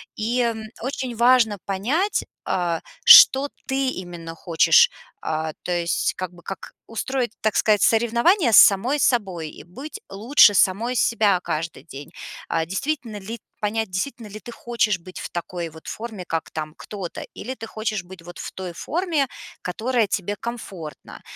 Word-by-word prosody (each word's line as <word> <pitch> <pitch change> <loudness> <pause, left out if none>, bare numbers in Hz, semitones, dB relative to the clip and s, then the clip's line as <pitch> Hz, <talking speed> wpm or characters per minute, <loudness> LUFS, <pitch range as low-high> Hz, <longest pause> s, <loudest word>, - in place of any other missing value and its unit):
И, 235 +4 0
м, 225 -2 -1 0.2
очень 255 -1 -4
важно 235 -2 +4
понять, 255 - 0 0.2
а, 170 -3 -1 0.2
что 275 +2 +9 0.2
ты 265 0 0
именно 175 -6 -7
хочешь, 170 - +4 0.3
а, 155 0 -2
то 180 - -4
есть 170 -1 0
как 185 -1 -5
бы 175 - -16
как 195 +2 -8 0.2
устроить, 245 +1 -2
так 215 -1 0
сказать, 210 -2 +3
соревнования 235 - +3
с - - +7
самой 235 +9 +6
собой 190 - 0
и - - -12
быть 280 - -9
лучше 220 +2 +5
самой 220 +7 +2
себя 210 -5 +3
каждый 160 -5 -4
день, 145 0 -10 0.4
а, 165 -1 0
действительно 235 - -3
ли, 225 +4 -7 0.2
понять, 220 0 -1
действительно 215 +5 -4
ли 210 +1 -9
ты 240 - -10
хочешь 230 -4 0
быть 185 +2 -10
в - - -6
такой 175 -1 -5
вот 160 0 -15
форме, 220 -5 -6
как 165 -1 -3
там 155 -1 -5
кто-то, 195 -5 -7
или 255 - -6
ты 225 -2 -8
хочешь 215 -3 -3
быть 180 -1 -13
вот 175 +1 -11
в - - -6
той 185 -2 -6
форме, 320 - -1 0.3
которая 225 +4 0
тебе 205 +1 -2
комфортна, 190 - -8
210 Hz, 160 wpm, -23 LUFS, 175-240 Hz, 0.4 s, что